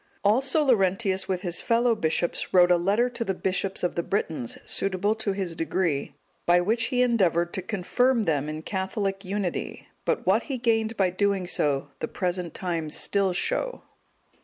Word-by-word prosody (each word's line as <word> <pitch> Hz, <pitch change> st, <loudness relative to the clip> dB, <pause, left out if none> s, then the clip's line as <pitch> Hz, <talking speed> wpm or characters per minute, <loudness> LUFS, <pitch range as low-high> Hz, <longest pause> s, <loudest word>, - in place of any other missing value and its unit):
Also 265 Hz, +8 st, +3 dB
Laurentius 195 Hz, -4 st, +2 dB
with 185 Hz, -2 st, -1 dB
his 175 Hz, -2 st, -1 dB
fellow 235 Hz, +1 st, +3 dB
bishops 170 Hz, -4 st, -1 dB
wrote 180 Hz, -1 st, +6 dB
a -, -, +7 dB
letter 200 Hz, +8 st, +2 dB
to 240 Hz, -1 st, -3 dB
the 190 Hz, -4 st, -2 dB
bishops 190 Hz, +1 st, -2 dB
of 180 Hz, -, +1 dB
the 170 Hz, -, -1 dB
Britons, 160 Hz, -, -2 dB
suitable 195 Hz, +2 st, 0 dB
to 220 Hz, -2 st, -2 dB
his 190 Hz, -4 st, -3 dB
degree, 165 Hz, -3 st, -1 dB, 0.3 s
by 175 Hz, +1 st, +6 dB
which 225 Hz, +6 st, +1 dB
he 250 Hz, +2 st, +2 dB
endeavoured 180 Hz, -8 st, +2 dB
to 190 Hz, -, -2 dB
confirm 225 Hz, +6 st, +1 dB
them 150 Hz, -5 st, 0 dB
in 155 Hz, +1 st, -5 dB
Catholic 195 Hz, +1 st, -2 dB
unity; 195 Hz, -1 st, -3 dB, 0.2 s
but -, -, -1 dB
what -, -, +4 dB
he 270 Hz, -, -1 dB
gained 225 Hz, -2 st, 0 dB
by 190 Hz, -2 st, +2 dB
so -, -, -19 dB
doing 200 Hz, -3 st, +1 dB, 0.5 s
the -, -, -2 dB
present 180 Hz, -2 st, -3 dB
times 165 Hz, -4 st, -3 dB
still 200 Hz, -2 st, +1 dB
show. -, -, -2 dB
195 Hz, 170 wpm, -26 LUFS, 175-225 Hz, 0.5 s, a